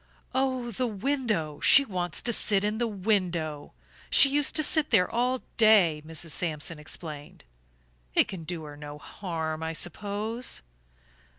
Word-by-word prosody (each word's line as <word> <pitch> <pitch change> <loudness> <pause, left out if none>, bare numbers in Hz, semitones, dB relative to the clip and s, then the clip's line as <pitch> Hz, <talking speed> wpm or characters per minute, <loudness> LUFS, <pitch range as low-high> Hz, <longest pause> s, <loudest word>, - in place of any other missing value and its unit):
"Oh, 260 -2 -1
the 250 +4 -2
window 215 - -2
she 280 - +6
wants 175 - -2
to 235 - +2
sit 205 -2 +1
in 210 +1 -1
the 240 - 0
window. 180 - -2 0.4
She 275 - +7
used 285 0 +1
to 310 - +4
sit 305 0 +3
there 190 -7 +4
all 250 +2 -1
day," 200 -9 +5
Mrs. 160 +1 -3
Sampson 155 -1 -1
explained. 150 -1 -7 0.7
"It - - +4
can 185 -4 -7
do 165 0 -6
her 150 -1 -9
no 145 0 -9
harm, 160 -1 -5
I 160 0 -3
suppose?" 210 - -3
190 Hz, 150 wpm, -27 LUFS, 160-235 Hz, 0.7 s, She